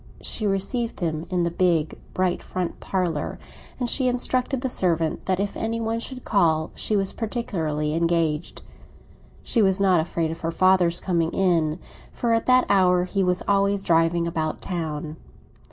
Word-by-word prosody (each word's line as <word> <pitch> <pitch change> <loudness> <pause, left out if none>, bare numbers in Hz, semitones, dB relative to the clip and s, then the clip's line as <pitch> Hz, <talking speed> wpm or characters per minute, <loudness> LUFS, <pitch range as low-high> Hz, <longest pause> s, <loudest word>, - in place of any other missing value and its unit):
She 215 - 0
received 205 +5 -1
him 160 -1 -2
in 180 -2 0
the 170 - 0
big, 170 -3 +1 0.2
bright 185 -1 0
front 180 -2 -4
parlour, 175 -6 -2 0.4
and 245 - -1
she 260 +2 +1
instructed 250 +1 0
the 260 - -1
servant 165 -9 -1
that 185 -1 +1
if 200 0 -2
any 225 +1 -2
one 225 0 -1
should 255 +2 -6
call 160 -6 +2
she 215 - 0
was 195 -1 0
particularly 160 -10 -2
engaged. 165 -1 0 0.8
She 230 - +1
was 190 -1 +3
not 190 -3 +4
afraid 160 0 -1
of 165 - -7
her 165 - -1
father's 180 0 +3
coming 170 -3 0
in, 165 -4 +1 0.3
for 235 -1 0
at 225 - 0
that 255 0 +5
hour 180 -2 +4
he 195 +2 -1
was 180 0 0
always 200 0 +2
driving 165 0 +2
about 160 -2 -2
town. 160 -3 -4
180 Hz, 165 wpm, -24 LUFS, 165-205 Hz, 0.8 s, that